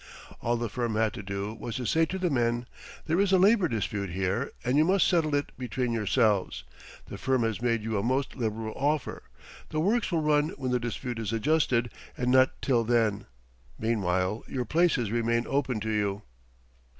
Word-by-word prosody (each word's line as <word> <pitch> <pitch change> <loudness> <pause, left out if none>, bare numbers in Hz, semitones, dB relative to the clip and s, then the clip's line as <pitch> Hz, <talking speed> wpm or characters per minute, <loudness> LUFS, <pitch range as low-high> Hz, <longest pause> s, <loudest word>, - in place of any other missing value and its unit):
All 120 0 0
the 120 0 -2
firm 120 0 -2
had 110 0 +1
to - - -6
do 100 +1 -4
was 115 0 -6
to 125 - -3
say 160 +8 +2
to 190 - -3
the 180 -3 0
men: 120 -2 +1 0.4
"There 165 +3 +1
is 200 -1 +3
a 190 - +6
labor 195 0 +4
dispute 105 - -2
here 95 +8 -1 0.2
and 125 +2 +1
you 150 - +5
must 190 +3 +3
settle 160 -5 +2
it 145 - -1
between 125 0 -2
yourselves. 105 - +1 0.4
The - - -9
firm 130 -2 +1
has 115 0 -1
made 115 -3 0
you 110 -2 -1
a - - 0
most 130 +5 -1
liberal 110 -2 -3
offer. 145 0 -1 0.5
The 155 - -2
works 210 +8 +1
will 165 -3 +1
run 150 0 +3
when 130 -2 -2
the 125 - +2
dispute 120 0 -4
is 110 -2 -3
adjusted, 120 -1 +1 0.3
and 125 0 0
not 130 0 +4
till 120 -4 +2
then. 110 -3 +1 0.5
Meanwhile 95 -2 0
your 125 -2 -3
places 150 - +2
remain 115 0 +1
open 135 -5 0
to 110 +1 -2
you." 105 -1 -1
120 Hz, 190 wpm, -28 LUFS, 110-145 Hz, 0.5 s, a